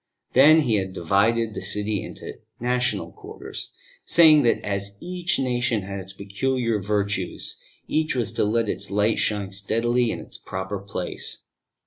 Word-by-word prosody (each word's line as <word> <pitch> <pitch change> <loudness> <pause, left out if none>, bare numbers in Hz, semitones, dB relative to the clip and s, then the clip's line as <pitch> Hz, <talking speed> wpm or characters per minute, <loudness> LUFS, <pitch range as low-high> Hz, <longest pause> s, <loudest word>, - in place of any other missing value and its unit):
Then 155 +5 +7
he 115 -7 +2
had 95 -1 -3
divided 110 +6 +1
the - - -5
city 105 +1 +1
into - - -9 0.2
national 120 -8 0
quarters, - - -8 0.3
saying 155 -3 +6
that 120 - +3
as 100 0 -3
each 180 0 -2
nation 120 -4 0
had 100 +1 -5
its 95 0 -8
peculiar 110 +4 -1
virtues, 100 -2 -2 0.3
each 155 -2 0
was 120 -4 0
to - - 0
let 110 +2 +1
its - - -3
light 105 +3 +1
shine 100 -3 0
steadily 115 +5 +1
in - - -3
its - - -8
proper 95 +1 -5
place. 100 -2 -4
105 Hz, 150 wpm, -24 LUFS, 100-125 Hz, 0.3 s, Then